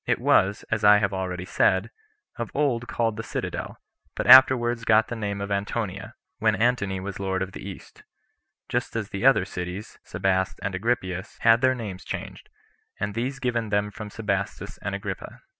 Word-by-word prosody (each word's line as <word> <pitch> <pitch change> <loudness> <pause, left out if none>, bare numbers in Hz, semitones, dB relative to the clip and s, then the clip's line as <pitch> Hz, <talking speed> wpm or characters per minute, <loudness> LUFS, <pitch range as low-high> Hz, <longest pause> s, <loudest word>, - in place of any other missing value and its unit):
It - - +1
was, 100 +2 +2
as 110 -1 0
I 105 0 +8
have 100 -1 0
already 90 -1 -3
said, 95 0 +2 0.4
of 120 - -4
old 130 -5 0
called 115 -2 -1
the 115 - -4
Citadel; - - -5 0.4
but - - -2
afterwards 120 -3 +7
got 110 -1 +4
the 120 - -3
name 100 -2 -3
of 100 0 -4
Antonia, 100 +1 -3 0.2
when 110 -1 +3
Antony 100 -3 +1
was 100 +1 -6
[lord 95 -1 -1
of 95 - -7
the - - -9
East], 95 -1 -10 0.7
just 120 -1 -2
as 110 -2 -3
the 105 +5 +1
other 135 -8 +5
cities, 90 +2 -6
Sebaste 95 -1 -1
and 95 - -2
Agrippias, 95 -2 -2
had 115 +1 +5
their 130 0 +3
names 105 -7 -6
changed, - - -7 0.5
and 100 0 -2
these 125 +5 -2
given 120 -4 -1
them 105 0 0
from 105 +1 -8
Sebastus 100 -2 -3
and - - -3
Agrippa. - - -6
105 Hz, 175 wpm, -25 LUFS, 95-115 Hz, 0.7 s, I